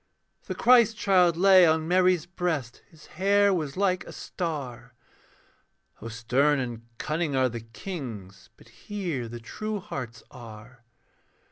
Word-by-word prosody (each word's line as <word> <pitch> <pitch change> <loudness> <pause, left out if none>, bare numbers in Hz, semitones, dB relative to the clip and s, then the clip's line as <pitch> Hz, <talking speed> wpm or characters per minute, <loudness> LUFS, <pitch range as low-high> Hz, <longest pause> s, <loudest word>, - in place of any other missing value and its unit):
The - - -4
Christ 235 -3 +5
child 180 -5 +3
lay 190 0 +7
on 160 -1 +3
Mary's 180 -2 +3
breast, 175 -9 -3
His 160 -2 -18
hair 200 +3 +2
was 155 -5 -3
like 185 -2 +1
a - - -10
star. 130 - -6 1.1
(O 115 - -7
stern 125 +6 +1
and 120 -3 -5
cunning 155 -1 -2
are 130 -1 +2
the 120 0 -6
kings, 115 - -8
But - - -19
here 170 - -5
the 120 +1 -7
true 215 - -5
hearts 125 - -7
are.) 115 0 -13
155 Hz, 135 wpm, -26 LUFS, 120-185 Hz, 1.1 s, lay